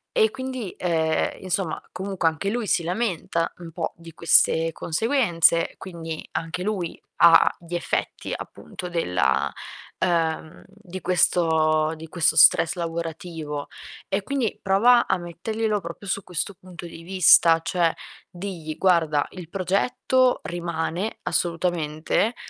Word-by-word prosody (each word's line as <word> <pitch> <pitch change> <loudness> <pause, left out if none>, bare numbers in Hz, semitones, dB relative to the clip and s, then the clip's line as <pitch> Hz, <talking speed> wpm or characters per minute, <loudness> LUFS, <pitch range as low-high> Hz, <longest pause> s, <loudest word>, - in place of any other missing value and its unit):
E 445 -2 +4
quindi, 260 -6 -5
uhm, 160 -3 +1
insomma, 185 -2 -2
comunque 190 -3 -2
anche 160 +5 -1
lui 235 -3 -2
si 170 - +2
lamenta 175 -3 -1
un 170 -2 -10
po' 165 0 -4
di 165 -1 -13
queste 165 0 +3
conseguenze, 170 - +2
quindi 165 -3 -7
anche 165 +2 -3
lui 190 -5 -3 0.3
ha 165 -1 +7
gli 170 0 -11
effetti 175 - -3
appunto 180 - -8
della 70 - 0 0.5
uhm, 165 -2 -1
di 190 -2 -10
questo 160 -3 +2
di 160 +1 -10
questo 160 -2 +2
stress 165 +2 +6
lavorativo. 165 -3 -5 0.4
E, 195 +1 0
quindi 265 -4 -2
prova 230 +6 +4
a - - +2
metterglielo 210 +5 -3
proprio 170 +4 -8
su 200 +1 -2
questo 180 +3 -3
punto 180 -1 -10
di 165 -1 -10
vista, 170 -2 +5
cioè 170 -1 +1 0.4
digli: 175 -4 -6
"Guarda, 160 -6 +2
il 180 -4 -9
progetto 245 +7 +1
rimane 170 +3 -3
assolutamente, 170 +4 0
175 Hz, 125 wpm, -24 LUFS, 165-195 Hz, 0.5 s, ha